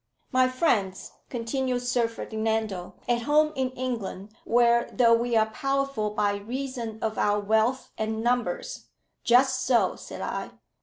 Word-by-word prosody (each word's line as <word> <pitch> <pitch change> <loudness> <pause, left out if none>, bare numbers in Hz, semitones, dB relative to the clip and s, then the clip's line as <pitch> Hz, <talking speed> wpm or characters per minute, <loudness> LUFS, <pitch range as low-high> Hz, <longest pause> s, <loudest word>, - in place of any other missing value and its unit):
"My 255 -1 +4
friends," 220 - 0 0.2
continued 250 +1 -2
Sir 245 -1 +1
Ferdinando, 220 -4 -3
"at 240 -1 +1
home 305 +4 +3
in 260 -1 0
England, 225 -6 -4
where, 235 0 +3
though 235 -2 +4
we 235 +1 +1
are 220 - +5
powerful 275 -4 -1
by 205 -1 0
reason 240 0 -5
of 220 0 -1
our 205 0 +2
wealth 220 +5 +1
and 220 0 -2
numbers - - -1 0.2
" - - -49
"Just 255 +2 +4
so," 245 -2 +2
said - - -9
I. - - -3
235 Hz, 145 wpm, -26 LUFS, 220-255 Hz, 0.2 s, are